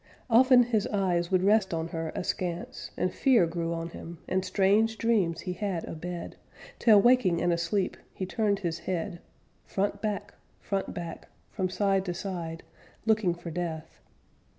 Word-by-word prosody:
Often 250 +1 +7
his 225 -4 0
eyes 180 -4 0
would 185 -1 +2
rest 200 -3 +3
on 165 0 -3
her 165 -1 -3
askance, 175 -1 -3
And 180 - 0
fear 250 -9 +4
grew 165 0 -3
on 165 0 -3
him, 170 0 -9
and 185 0 0
strange 205 +4 +2
dreams 200 -9 +1
he 180 - -3
had 180 -2 -2
a - - -6
bed, 175 +2 -6 0.4
Till 215 -3 +7
waking 210 -7 +4
and 175 0 +2
asleep 170 +3 0 0.2
he 190 - -4
turned 205 +1 0
his 170 -3 -2
head, 175 0 -2 0.4
Front 200 +1 -2
back, 205 -2 -3 0.3
front 195 -1 -2
back, 170 -2 -6 0.2
from 185 -1 -1
side 195 0 +1
to 175 -2 -3
side, 170 -5 -5 0.4
Looking 215 -6 +2
for 175 -1 -8
Death. 160 -1 -5
185 Hz, 160 wpm, -28 LUFS, 170-205 Hz, 0.4 s, Often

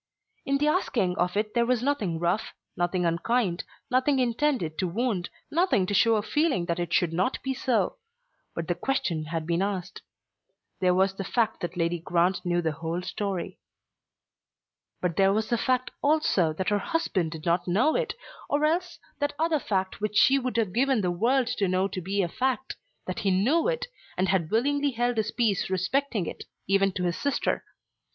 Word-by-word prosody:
In 275 0 +2
the 295 +2 +1
asking 235 - +1
of 180 +3 +1
it 210 0 -1
there 235 -1 +2
was 250 -1 +1
nothing 220 - 0
rough, 175 +5 -1 0.2
nothing 175 0 0
unkind, 175 +2 0 0.3
nothing 260 +2 +3
intended 245 - 0
to 185 - +1
wound, 205 -1 -1 0.2
nothing 330 - +2
to 205 - -3
show 225 +3 +4
a 210 - 0
feeling 295 - +1
that 170 0 -2
it 175 -1 -3
should 165 -1 +2
not 185 +10 +1
be 265 - -1
so; 260 - 0 0.6
but 165 -1 -3
the 175 - +1
question 175 - -1
had 160 0 -3
been 170 +2 0
asked. 190 -2 -3 0.8
There 180 -1 +3
was 190 +1 +3
the 195 - -5
fact 230 +3 0
that 175 +1 -5
Lady 170 0 0
Grant 175 +2 +1
knew 175 -1 0
the 160 - +1
whole 165 +3 -4
story. 195 -1 -4 1.4
But 180 -3 -1
there 195 0 +5
was 215 +2 0
the 235 - +2
fact 255 -1 0
also 285 - +3
that 185 +4 -2
her 205 0 +2
husband 195 - -1
did 160 -1 -9
not 175 +1 +1
know 235 - +3
it, - - -1 0.3
or 295 +1 +2
else 350 +3 0 0.2
that 290 -1 -1
other 320 -1 +1
fact 190 -5 -2
which 210 0 -2
she 275 -2 +6
would 255 -2 -3
have 215 -6 0
given 260 0 +2
the 180 -2 0
world 245 +9 +2
to 205 -4 0
know 185 +1 +1
to 185 -1 -4
be 195 +3 0
a - - 0
fact, 265 +7 -2 0.3
that - - -4
he 200 - +1
knew 240 - +3
it, - - -1 0.3
and 185 0 +1
had 175 -4 +1
willingly 285 +5 +1
held 240 0 0
his 215 0 0
peace 220 -5 0
respecting 195 +3 0
it, - - -7 0.2
even 195 +1 +3
to 180 - -3
his 175 -1 0
sister. 285 -1 0
200 Hz, 190 wpm, -27 LUFS, 175-260 Hz, 1.4 s, she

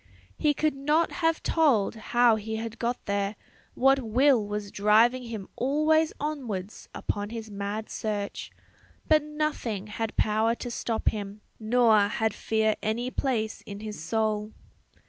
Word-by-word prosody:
He 295 -1 +1
could 310 +1 +1
not 295 +4 +1
have 325 -2 0
told 275 -11 +3
how 240 +1 +3
he 220 +1 -4
had 225 0 -5
got 240 +1 -2
there; 200 +1 -1 0.4
what 270 +1 +4
will 250 +1 +3
was 205 0 -4
driving 220 +5 +4
him 225 -5 -6
always 305 +4 +2
onwards 240 -10 -4
upon 205 0 -3
his 225 -1 -7
mad 205 +2 -4
search; 205 -2 -4 0.6
but 310 -1 +5
nothing 300 -9 -3
had 215 +1 -4
power 220 +2 +2
to 245 - -6
stop 230 -1 0
him, 205 0 -6 0.2
nor 225 -1 +4
had 220 +1 0
fear 220 -1 +1
any 235 +4 -1
place 225 -6 -1
in 200 0 -7
his 215 -5 -6
soul. 215 +1 -1
225 Hz, 145 wpm, -27 LUFS, 210-265 Hz, 0.6 s, but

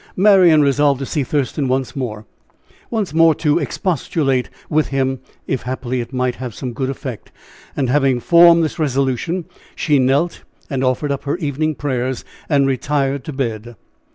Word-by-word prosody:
Marian 185 -6 +6
resolved 140 0 +3
to 135 - -4
see 145 +1 -1
Thurston 140 +1 -1
once 130 0 -1
more 110 -6 -4 0.6
once 215 -8 -2
more 165 -1 +5
to 150 0 +1
expostulate 145 -5 -1 0.2
with 155 0 +1
him, 135 -1 -1 0.3
if 135 - -2
happily 125 0 -3
it 120 +1 -8
might 125 -1 0
have 125 -4 -6
some 125 -2 -5
good 130 +2 -2
effect. 130 -4 -7 0.5
And 135 - +1
having 135 -1 +2
formed 170 +3 +6
this 160 - -3
resolution, 140 +4 -1 0.3
she 150 -3 +2
knelt 135 +7 +1 0.3
and 135 -1 -1
offered 130 +3 0
up 140 0 -4
her 145 +4 -1
evening 155 -1 -1
prayers, 130 -3 -2 0.2
and 140 -3 +3
retired 135 0 -1
to 155 - -5
bed. 120 -3 -4
135 Hz, 160 wpm, -19 LUFS, 130-155 Hz, 0.6 s, Marian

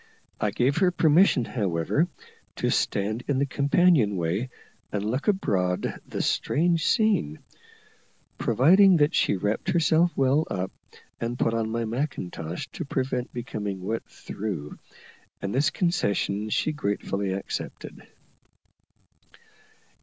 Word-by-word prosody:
I - - +1
gave 130 +3 +1
her 185 -1 +4
permission, 160 -5 +4
however, 100 - 0 0.5
to - - 0
stand 110 +4 0
in 140 - +1
the 140 - +2
companion 140 - +3
way 90 +9 -1 0.4
and 105 0 -2
look 125 +6 -2
abroad 95 - +1
upon - - -5
the - - -3
strange 165 +1 +1
scene, 215 - +2 1.0
providing 185 +7 +5
that 150 +2 +3
she - - +2
wrapped 105 +3 -2
herself 170 0 +3
well 135 +4 +2
up, 95 0 -3 0.5
and 120 +1 -3
put 115 - +1
on 115 -1 -1
my 115 +1 -2
macintosh 100 - -4
to - - -6
prevent 130 -2 -2
becoming 105 -5 -4
wet 110 +4 -2
through, 90 -9 -6 0.6
and 100 - -4
this 135 +3 +3
concession 105 - 0
she 155 - 0
gratefully 100 -7 -2
accepted. 95 - -6
120 Hz, 125 wpm, -26 LUFS, 100-155 Hz, 1.0 s, providing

